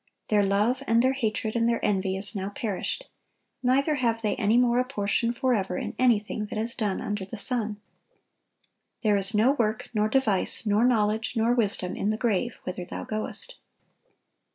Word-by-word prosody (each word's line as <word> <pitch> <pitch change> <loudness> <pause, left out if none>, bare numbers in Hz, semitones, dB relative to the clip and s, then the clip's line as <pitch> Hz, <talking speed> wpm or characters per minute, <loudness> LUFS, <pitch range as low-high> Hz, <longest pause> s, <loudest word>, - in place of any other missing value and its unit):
"Their 210 -1 +4
love, 205 +6 +1
and 230 +1 +4
their 260 +1 +3
hatred, 220 -3 -2
and 230 0 +2
their 235 - +1
envy, 190 -1 0
is 205 +3 -2
now 195 0 -2
perished; 210 - -3 0.5
neither 275 +4 +2
have 230 -3 0
they 210 - +1
any 220 +1 +3
more 245 0 +4
a - - +3
portion 230 -2 0
forever 235 -7 0
in - - -4
anything 215 -4 +2
that 210 - -6
is 225 +2 -2
done 210 -5 -2
under 205 -1 -3
the 195 +4 -7
sun." 215 -1 -2 1.2
"There 210 -2 +4
is 200 +2 0
no 225 +6 +5
work, 220 -6 -1
nor 215 -1 +1
device, 225 -5 +1
nor 210 +2 +3
knowledge, 220 -2 +1
nor 230 +1 +3
wisdom, 205 -6 0
in 205 - -1
the 215 - 0
grave, 230 +1 0
whither 180 0 -4
thou 175 - -6
goest." 215 0 -3
220 Hz, 175 wpm, -27 LUFS, 205-240 Hz, 1.2 s, no